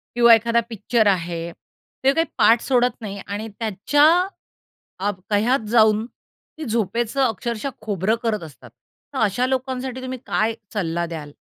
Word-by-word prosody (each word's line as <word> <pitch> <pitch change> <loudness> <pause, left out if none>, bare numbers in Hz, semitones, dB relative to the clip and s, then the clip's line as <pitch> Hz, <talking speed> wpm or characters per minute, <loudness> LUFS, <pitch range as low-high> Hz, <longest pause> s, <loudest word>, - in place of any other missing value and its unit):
किंवा 235 -1 +7
एखादा 230 +1 +1
पिक्चर 220 0 +1
आहे. 170 -3 0 0.6
ते 270 +1 +4
काही 325 +3 +2
पाठ 230 +1 +5
सोडत 250 -1 +2
नाही 200 -2 -6
आणि 205 +2 -4
त्याच्या 225 +8 +2 1.0
अ, 205 +2 +1 0.2
कह्यात 220 +3 +2
जाऊन 220 -2 +4
ती 310 +4 -14
झोपेचं 230 +3 -1
अक्षरशः 235 +2 -2
खोबरं 205 0 0
करत 215 -5 -1
असतात. 130 -6 -12 0.4
तर 265 - -3
अशा 225 +4 +1
लोकांसाठी 260 0 -3
तुम्ही 255 0 -5
काय 220 +1 +1 0.2
सल्ला 170 -3 -1
द्याल? 155 -3 -7
225 Hz, 140 wpm, -22 LUFS, 200-245 Hz, 1.0 s, किंवा